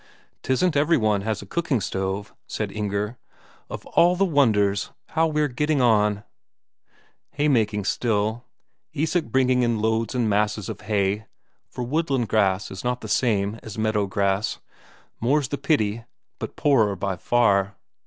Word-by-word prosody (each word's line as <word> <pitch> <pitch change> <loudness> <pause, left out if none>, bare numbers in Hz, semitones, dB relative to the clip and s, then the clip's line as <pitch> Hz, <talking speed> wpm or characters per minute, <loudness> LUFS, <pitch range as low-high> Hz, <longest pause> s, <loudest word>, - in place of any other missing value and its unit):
"'Tisn't 150 +7 +1
every 150 +4 +3
one 105 -3 +1
has 110 0 -3
a - - -11
cooking 165 -7 -1
stove," 95 +1 -3
said 105 -2 -3
Inger. 105 +2 -3 0.5
"Of - - -7
all 175 +1 +3
the 195 +2 +2
wonders, 105 - +2 0.2
how 165 0 +2
we're 150 -1 +1
getting 150 +3 0
on!..." 105 -4 +3 1.1
Haymaking 110 -9 +1
still; 110 +1 0 0.5
Isak 160 +3 0
bringing 130 -1 +2
in 120 -2 +1
loads 110 +3 0
and 120 -3 +1
masses 105 -1 0
of - - -6
hay, 105 0 -1 0.4
for 125 - -5
woodland 135 -3 -1
grass 100 -2 +1
is 95 - -7
not 125 0 -1
the - - -7
same 105 -3 0
as 110 0 -9
meadow 110 -2 0
grass, 100 +1 0 0.6
more's 135 +3 +1
the 145 - -3
pity, 115 -6 0 0.3
but - - -6
poorer 110 -9 +3
by 95 +1 -2
far. 100 -2 +2
110 Hz, 145 wpm, -24 LUFS, 105-135 Hz, 1.1 s, every